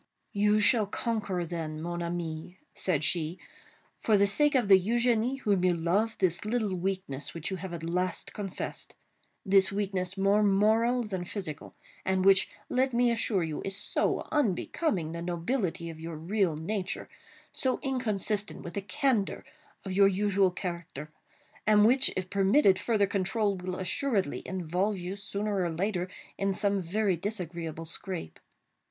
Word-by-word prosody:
"You 210 +1 +3
shall 215 0 +4
conquer, 205 -5 -2
then, 160 -2 -4
mon 175 +2 -4
ami," 170 0 -4 0.2
said 165 -5 0
she, 165 +1 0 0.6
"for 215 -2 +3
the 200 - +5
sake 290 +9 +3
of 245 -5 +3
the 190 -2 +7
Eugénie 240 +3 +2
whom 200 -6 +2
you 180 -1 +3
love, 195 +7 +1
this 175 -3 +1
little 215 -2 0
weakness 185 -7 -3
which 165 +3 -4
you 190 - -2
have 185 +1 -6
at 170 -2 -6
last 180 +1 -2
confessed—this 195 0 -2
weakness 195 -2 -2
more 200 +2 +3
moral 220 +5 +3
than 190 -5 -4
physical—and 185 +1 -4
which, 195 -1 +5 0.2
let 260 0 +1
me 240 0 +4
assure 215 -5 +1
you, 155 -2 -3
is 195 0 -3
so 210 - 0
unbecoming 205 - 0
the 170 0 -5
nobility 175 +1 -2
of 160 - -11
your 165 0 -6
real 175 +1 0
nature—so 195 - -3
inconsistent 215 -6 -1
with 170 - -7
the 200 - -2
candor 205 +2 0 0.4
of 190 - -3
your 195 +1 +6
usual 195 0 +2
character—and 175 +4 -2
which, 260 +4 +5
if 185 -1 -2
permitted 195 0 +4
further 205 -1 +2
control, 200 +1 0
will 180 0 -4
assuredly 190 - -1
involve 185 +3 -1
you, 180 +2 -5
sooner 205 +1 -3
or 175 - 0
later, 180 +2 -1 0.3
in 195 -1 0
some 200 -1 +1
very 195 +2 +1
disagreeable 170 -4 -5
scrape. 165 - -5
195 Hz, 145 wpm, -29 LUFS, 175-210 Hz, 0.6 s, the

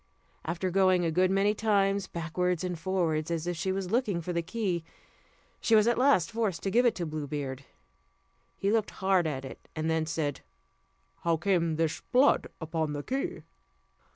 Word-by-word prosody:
After 175 +3 -2
going 185 -1 +3
a 165 - +1
good 185 +3 +3
many 195 +2 +3
times 200 -2 +1
backwards 175 +1 -1
and 180 -2 -3
forwards, 165 -3 0
as 165 -1 -2
if 175 0 -2
she 190 +4 -1
was 190 -1 -3
looking 220 -7 +1
for 175 +1 -4
the 170 - 0
key, 180 -2 -2 0.8
she 225 - +3
was 215 -1 +6
at 240 0 +3
last 255 - +4
forced 220 -6 -1
to 195 - -1
give 245 +3 +4
it 235 - +1
to 175 - -3
Blue 155 -2 -4
Beard. 140 -2 -4 0.9
He 200 - 0
looked 220 -1 +1 0.2
hard 185 -3 +4
at 135 -3 -3
it, 135 - -11
and 160 +1 -1
then 160 -1 0
said: 150 -3 -2 0.8
"How 170 -1 +1
came 170 -2 +1
this 160 -1 -1
blood 260 +3 +4
upon 160 -2 -2
the 145 0 -4
key?" 305 - -3
180 Hz, 180 wpm, -29 LUFS, 160-200 Hz, 0.9 s, was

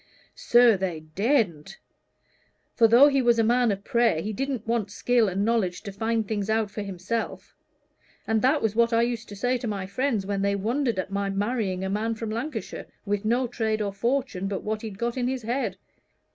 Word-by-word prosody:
"Sir, 240 -3 +5
they 180 -4 -3
daredn't. 195 - 0 1.0
For 230 - +5
though 240 +6 +7
he 275 -2 +2
was 240 -1 +3
a 225 - +3
man 240 0 +3
of 200 0 -4
prayer, 235 -9 +2
he 210 +6 -3
didn't 265 0 -3
want 230 -3 -1
skill 230 +2 +2
and 195 +2 -1
knowledge 215 -6 0
to 200 - -6
find 225 +1 -1
things 205 -1 -2
out 220 -2 +1
for 210 - -5
himself; 200 +3 -4 0.7
and 220 -1 +1
that's 255 -5 +2
what 235 0 +3
I 230 0 +4
used 235 -2 -3
to 205 - -8
say 245 +4 0
to 235 - -4
my 200 -3 -3
friends 220 +1 -1
when 200 0 -2
they 200 0 +1
wondered 235 +3 -1
at 185 +1 -3
my 200 0 -1
marrying 200 -2 -1
a - - -2
man 220 +3 -1
from 225 -1 -5
Lancashire, 235 +1 -5 0.2
with 205 0 -2
no 240 +4 +2
trade 220 -2 -1
nor 205 -2 -2
fortune, 235 -3 -1
but 195 -1 -4
what 215 0 -3
he'd 215 -4 -7
got 235 +3 -2
in 245 -1 0
his 260 -2 -3
head. 245 +5 -2
220 Hz, 200 wpm, -26 LUFS, 200-240 Hz, 1.0 s, though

